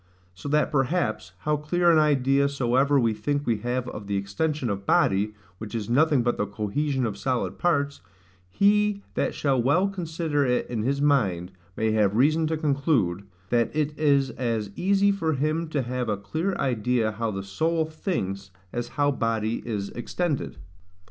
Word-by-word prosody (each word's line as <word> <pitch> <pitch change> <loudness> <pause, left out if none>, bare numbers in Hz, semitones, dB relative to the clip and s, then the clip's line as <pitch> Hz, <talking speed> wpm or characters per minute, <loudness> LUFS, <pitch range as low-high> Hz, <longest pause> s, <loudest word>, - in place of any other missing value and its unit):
So 90 +10 -7
that 150 +1 +2
perhaps, 135 - 0
how 150 +8 +1
clear 170 +4 +2
an 160 - +5
idea 140 -2 +3
soever 140 +1 +2
we 115 -3 +2
think 145 +7 -2
we 115 -2 +1
have 125 +2 -2
of 105 -1 -8
the 100 -1 -1
extension 130 +9 -2
of 100 -2 -4
body, 105 +2 +2 0.2
which 110 +1 -7
is 110 0 -3
nothing 145 -1 +4
but 120 0 0
the 105 - -1
cohesion 125 +7 -1
of 100 -3 -4
solid 130 -2 -2
parts, 145 -5 0 0.5
he 205 - +2
that - - -1
shall 135 -4 +1
well 155 +11 +3
consider 165 -5 -1
it 125 -2 +1
in 115 -3 -3
his 140 +5 0
mind, 95 -12 +1 0.3
may 110 0 +1
have 105 -2 +2
reason 155 +6 +3
to 160 0 -1
conclude, 140 - 0 0.3
That 120 +3 +1
it 150 -1 0
is 140 -3 +2
as 115 -4 -2
easy 200 +2 +3
for 165 -5 0
him 155 +4 -1
to 150 -4 -1
have 125 -1 -3
a 105 - 0
clear 160 - -2
idea 125 -5 0
how 115 +1 -2
the 95 -2 -4
soul 160 - 0
thinks 100 - -4 0.2
as 120 0 -2
how 145 0 +3
body 115 -3 -1
is 100 -4 -3
extended. 150 +5 -3
135 Hz, 175 wpm, -25 LUFS, 110-155 Hz, 0.5 s, an